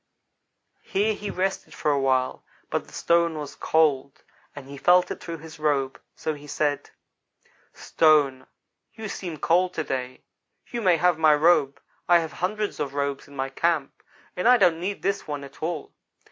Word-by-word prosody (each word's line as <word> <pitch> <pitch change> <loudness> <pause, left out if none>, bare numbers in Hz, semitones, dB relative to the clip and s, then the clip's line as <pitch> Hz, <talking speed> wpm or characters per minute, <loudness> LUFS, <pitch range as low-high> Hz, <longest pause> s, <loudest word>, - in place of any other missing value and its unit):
Here 210 +3 0
he 210 0 -6
rested 190 +1 -3
for 150 - 0
a 140 - +1
while, 130 -1 0 0.3
but - - -2
the - - -17
stone 170 -1 +1
was 145 -2 -6
cold, 150 -2 +1 0.3
and 140 -2 -9
he 140 - -9
felt 180 +5 +4
it - - -5
through 165 -1 -6
his 160 0 -12
robe; 140 -3 0
so 155 - -3
he 145 0 -12
said: 145 0 -1 0.8
"'Stone, 145 -5 +2 0.5
you 220 -1 -6
seem 175 -5 -6
cold 180 +4 +2
to 155 - -1
day. 130 -2 -4 0.4
You 240 - -5
may 180 -5 +4
have 175 0 +2
my 155 -2 +6
robe. 150 -3 +3 0.3
I 175 - +8
have 165 -2 -3
hundreds 210 +3 -2
of 140 -2 -3
robes 140 -1 -2
in 140 - -15
my 135 0 -2
camp, 155 0 -1 0.3
and 180 - 0
I 250 0 +7
don't 175 -6 +3
need 195 +3 -4
this 200 0 -1
one 145 -2 -4
at 140 - -13
all.' 160 -1 -4
155 Hz, 175 wpm, -25 LUFS, 140-180 Hz, 0.8 s, I